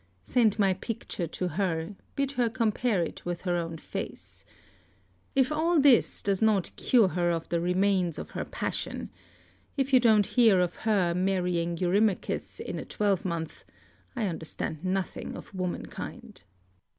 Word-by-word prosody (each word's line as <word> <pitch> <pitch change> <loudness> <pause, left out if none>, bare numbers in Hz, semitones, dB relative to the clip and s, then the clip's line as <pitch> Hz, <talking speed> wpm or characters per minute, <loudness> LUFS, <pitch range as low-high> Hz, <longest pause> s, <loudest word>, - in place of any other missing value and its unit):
Send 220 - +2
my 195 -3 +3
picture 190 -3 -4
to 180 +3 -3
her, 170 +1 -2 0.2
bid 275 -1 0
her 245 -4 +1
compare 225 -4 +1
it 165 - -6
with 175 -1 -3
her 180 -2 0
own 165 -1 -3
face. - - -7 0.9
If 265 +1 +3
all 320 +2 +2
this 275 -4 +4
does 200 0 0
not 215 -4 +2
cure 230 -7 +4
her 175 -1 0
of 165 -1 -1
the 170 0 0
remains 180 -1 +1
of - - -7
her - - -3
passion, - - -4 0.7
if 270 0 0
you 255 - +8
don't 220 -4 +5
hear 225 -5 +4
of 180 -1 +1
her 200 -6 +1
marrying 180 -2 0
Eurymachus 190 +3 0
in - - -4
a - - -4
twelvemonth, 185 -6 -1 0.5
I 235 -4 0
understand 160 -2 -4
nothing 190 0 -2
of - - -11
womankind. 185 -2 -6
190 Hz, 150 wpm, -28 LUFS, 175-225 Hz, 0.9 s, you